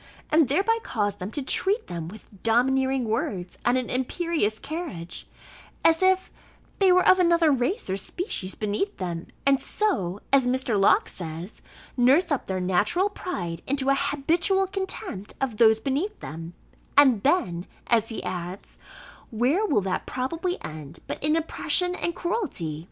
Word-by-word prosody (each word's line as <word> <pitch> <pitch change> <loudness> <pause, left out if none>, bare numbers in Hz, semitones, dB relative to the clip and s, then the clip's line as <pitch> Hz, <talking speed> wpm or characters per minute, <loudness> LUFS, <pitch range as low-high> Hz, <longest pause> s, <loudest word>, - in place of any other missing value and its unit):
and 310 -2 +5
thereby 395 - +2
cause 205 - -2
them 185 0 -5
to 285 +5 -4
treat 400 - +1
them 165 -2 -5
with 200 +1 -13
"domineering 265 +3 +2
words, 220 - -3
and 245 +1 +3
an 255 - -1
imperious 260 - 0
carriage, 220 - -6 0.6
as 325 +1 +5
if 375 0 +2 0.5
they 385 -2 +5
were 365 0 +4
of 370 - +6
another 340 -3 +4
race 275 - 0
or 190 - -1
species 195 - -4
beneath 215 - -2
them; 175 -3 -4 0.2
and 275 -1 +4
so," 230 - -1
as 265 -2 +5
Mr. 255 -2 0
Locke 195 0 +4
says, 170 +3 -7 0.3
"nurse 270 +8 +4
up 285 - -1
their 190 -1 -2
natural 190 - +1
pride 175 - -5
into 270 0 0
an 275 - +4
habitual 330 +7 +1
contempt 380 - -5
of 255 -5 -2
those 220 -1 +5
beneath 290 - -2
them; 165 +2 -8 0.4
and 260 -7 +6
then," 185 - +1 0.2
as 225 -2 +2
he 225 - -5
adds, 180 +1 -6 0.5
"where 250 - +1
will 245 - +2
that 190 -1 -3
probably 330 +8 -2
end, 155 0 -8
but - - -6
in 305 +1 +3
oppression 360 +2 +1
and 345 -1 -2
cruelty?" 345 - -3
260 Hz, 155 wpm, -25 LUFS, -, 0.6 s, of